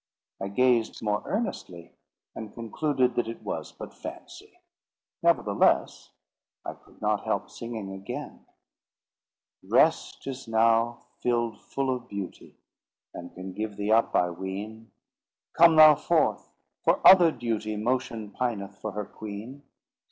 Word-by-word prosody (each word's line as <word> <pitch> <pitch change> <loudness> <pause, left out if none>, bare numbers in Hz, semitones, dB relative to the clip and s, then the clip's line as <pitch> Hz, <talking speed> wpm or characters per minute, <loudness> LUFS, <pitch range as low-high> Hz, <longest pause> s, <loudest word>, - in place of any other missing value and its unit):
I 95 - -2
gazed 120 +2 +1
more 105 -1 0
earnestly, 95 - -4 0.4
and 110 -2 -8
concluded 125 +2 0
that 120 - -1
it 115 - -7
was - - -5
but - - -10
fancy. 365 +2 -10 0.7
Neverthless 140 -12 +2 0.6
I - - -4
could - - -23
not - - +1
help - - -2
singing 115 -4 -6
again— 95 0 -8 1.1
"Rest - - +2
is 135 -1 -6
now 115 +1 +2 0.2
filled 120 -3 -1
full 135 -1 -2
of 125 -1 -9
beauty, 100 -3 -7 0.6
And 90 - -9
can 95 0 -7
give 105 +1 -5
thee 105 +1 -1
up, 115 +1 +3
I 90 0 +3
ween; 100 +5 -7 0.6
Come 165 -1 +6
thou 155 -1 +10
forth, - - 0 0.3
for - - +3
other 180 -3 +9
duty 110 -4 -3
Motion 110 -2 -2
pineth 100 -6 -3
for 110 - -4
her 105 -1 -4
queen. 110 +8 -9
115 Hz, 130 wpm, -27 LUFS, 105-125 Hz, 1.1 s, thou